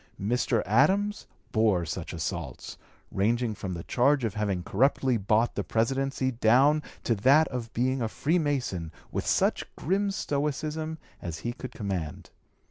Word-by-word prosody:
Mr. 115 +2 +1
Adams 190 - +2 0.2
bore 105 -6 +2
such 75 - -5
assaults, 80 -5 -5 0.4
ranging 115 +3 +1
from 95 -3 -5
the 85 - -6
charge 135 +2 +2
of 110 -4 -1
having 100 -4 -1
corruptly 130 +5 +2
bought 110 +2 +2
the - - -2
Presidency 130 +3 0
down 130 +6 +4 0.2
to 115 - +2
that 135 +9 +5
of 120 -3 -5
being 130 +2 0
a 115 - +1
Freemason 140 - -1 0.2
with - - -3
such - - +2
grim 195 +6 0
stoicism 155 -1 -2 0.2
as 85 -3 -5
he 120 - -1
could 130 - -8
command. 95 - -4
120 Hz, 140 wpm, -28 LUFS, 100-140 Hz, 0.4 s, that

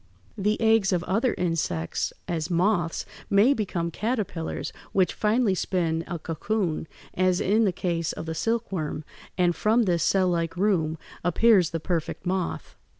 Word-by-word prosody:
The 210 0 0
eggs 220 -3 +4
of 180 -2 +1
other 225 +7 +1
insects, 165 - -1 0.2
as 165 -1 -2
moths, 175 -1 +1 0.2
may 205 +7 +5
become 180 -8 -2
caterpillars, 210 -6 -3 0.2
which 190 -2 +2
finally 215 -1 +2
spin 165 -3 0
a 175 - -3
cocoon, 165 +1 -2 0.3
as 185 -1 +2
in 215 +4 +3
the 195 - +3
case 170 -2 -1
of - - -6
the 160 - -3
silkworm, 190 -7 -2 0.3
and 175 -2 +3
from 225 +3 +3
this 175 -5 +1
cell 185 +1 +3
like 165 -1 -1
room 175 -5 +1 0.3
appears 180 0 +4
the 165 - -3
perfect 165 +2 -3
moth. 185 -1 -2
180 Hz, 150 wpm, -26 LUFS, 165-210 Hz, 0.3 s, may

